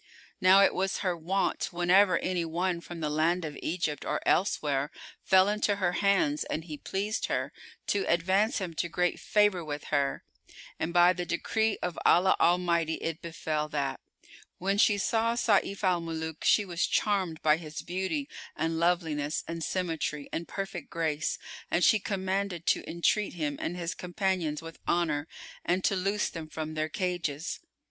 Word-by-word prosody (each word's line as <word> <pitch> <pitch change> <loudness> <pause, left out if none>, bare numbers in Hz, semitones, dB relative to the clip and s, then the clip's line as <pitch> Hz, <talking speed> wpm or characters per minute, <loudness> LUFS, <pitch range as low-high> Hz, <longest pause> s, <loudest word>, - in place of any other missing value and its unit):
Now 190 +2 +7
it - - +4
was 190 +1 -1
her 180 -2 +1
wont, 180 +4 0
whenever 180 +1 +4
any 180 -2 -1
one 170 +2 -1
from 170 -1 -8
the 150 - -1
land 165 +3 +1
of 150 -1 -6
Egypt 155 -4 -2
or 150 - -1
elsewhere 145 -7 +1 0.3
fell 190 0 +5
into 210 0 +1
her 185 -3 +1
hands 185 -6 +2
and 160 - -3
he 155 -2 -7
pleased 205 +3 -2
her, - - -2 0.3
to 200 - 0
advance 190 - +2
him 185 -4 -3
to 170 +2 -2
great 180 +1 0
favour 205 -4 +2
with 150 -1 -5
her; 140 -1 +1 0.6
and 160 - -1
by 175 +1 +6
the 180 0 -3
decree 220 +5 0
of 180 -2 -2
Allah 185 +2 +5
Almighty 170 -2 +2
it 165 0 -4
befel 155 -2 -3
that, 140 -2 -2 0.6
when 195 +2 0
she 205 -1 +5
saw 230 +3 +1
Sayf 205 -3 +1
al 180 -2 +2
Muluk 160 -1 -5
she 210 - +4
was 175 -2 -1
charmed 190 -6 0
by 150 0 +5
his 155 -2 -7
beauty 190 - -2 0.3
and 160 +1 -1
loveliness 160 -4 0
and 165 0 -4
symmetry 160 -5 -2
and 165 - -3
perfect 195 -5 -5
grace, 155 -2 -1 0.3
and 175 - +1
she 215 - +5
commanded 190 -3 -2
to - - +1
entreat 185 +5 +1
him 150 -4 -2
and 175 - -3
his 170 -1 -3
companions 180 -4 -2
with 165 0 -10
honour 160 -3 +1 0.4
and 180 +2 0
to 195 - +2
loose 195 +3 0
them 165 -2 -7
from 155 0 -5
their 155 0 -1
cages. 175 -4 -2
175 Hz, 170 wpm, -29 LUFS, 160-190 Hz, 0.6 s, Now